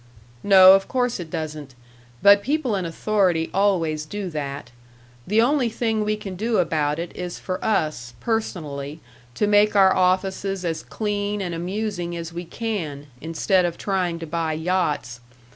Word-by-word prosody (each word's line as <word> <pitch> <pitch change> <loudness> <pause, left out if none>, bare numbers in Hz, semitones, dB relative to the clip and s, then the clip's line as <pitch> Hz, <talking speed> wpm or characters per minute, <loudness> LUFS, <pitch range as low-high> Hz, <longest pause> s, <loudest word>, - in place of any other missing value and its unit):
"No, 190 -2 +8
of 195 0 +2
course 250 -4 0
it 170 -2 -6
doesn't. 150 -4 -6 0.5
But 200 0 +7
people 275 -2 0
in 190 -2 -2
authority 180 -2 0
always 170 -6 +1
do 200 0 -5
that. 140 -5 -5 0.6
The 215 +3 +4
only 260 -1 +2
thing 220 -1 -1
we 215 0 0
can 195 -3 -7
do 220 +4 0
about 150 -4 +1
it 170 +1 -6
is 180 -1 -5
for 185 -1 -5
us, 155 - -1
personally, 155 - -3 0.4
to - - +1
make 210 0 +4
our 190 -1 +6
offices 190 +1 0
as 165 -1 -2
clean 205 -1 -3
and 180 -3 -3
amusing 175 0 -3
as 165 0 -6
we 175 +1 -5
can, 165 -10 -4
instead 165 +4 +1
of 175 -1 -2
trying 185 -4 -1
to 165 - -6
buy 165 0 -2
yachts. 155 -7 -1
185 Hz, 160 wpm, -23 LUFS, 160-205 Hz, 0.6 s, No